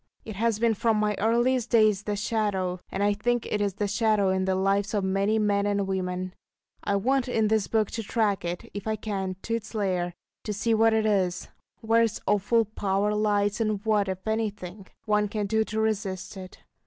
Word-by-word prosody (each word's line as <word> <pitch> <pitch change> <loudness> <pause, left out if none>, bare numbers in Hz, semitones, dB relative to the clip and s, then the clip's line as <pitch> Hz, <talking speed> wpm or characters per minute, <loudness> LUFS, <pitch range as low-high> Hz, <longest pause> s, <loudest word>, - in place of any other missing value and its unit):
It 215 - -7
has 225 +1 +1
been 230 0 +2
from 220 +1 +1
my 210 0 +1
earliest 240 +2 +2
days 215 -4 +4
the 210 - -1
Shadow; 200 -4 -1
and 195 - -1
I 205 0 +3
think 240 +3 0
it 210 - -1
is 200 -2 0
the 205 0 -1
shadow 215 -2 +2
in 190 0 +1
the 190 0 +1
lives 195 +2 +1
of 205 - +1
many 195 +3 +1
men 205 -1 +1
and 200 -1 0
women. 185 -1 -3 0.5
I 200 - 0
want 260 +6 +1
in 220 -3 +1
this 220 -3 +1
book 215 -2 +1
to 225 - -3
track 210 -3 0
it, 175 0 -4
if 205 +1 -6
I 220 - +1
can, 195 -3 -3
to 230 - -3
its 230 0 -4
lair, 180 -4 -1 0.3
to 210 - -3
see 225 +3 0
what 225 0 +4
it 220 0 +1
is, 185 -4 0 0.3
where 225 +1 +3
its 230 -3 0
awful 210 +3 +2
power 205 0 -1
lies, 205 0 +1
and 215 -2 0
what, 210 -3 +2
if 190 0 -5
anything, 205 -3 -3 0.2
one 210 -1 +2
can 210 0 -2
do 220 +2 +1
to 215 +1 -3
resist 205 -3 -2
it. 185 -1 -11
210 Hz, 205 wpm, -26 LUFS, 195-220 Hz, 0.5 s, days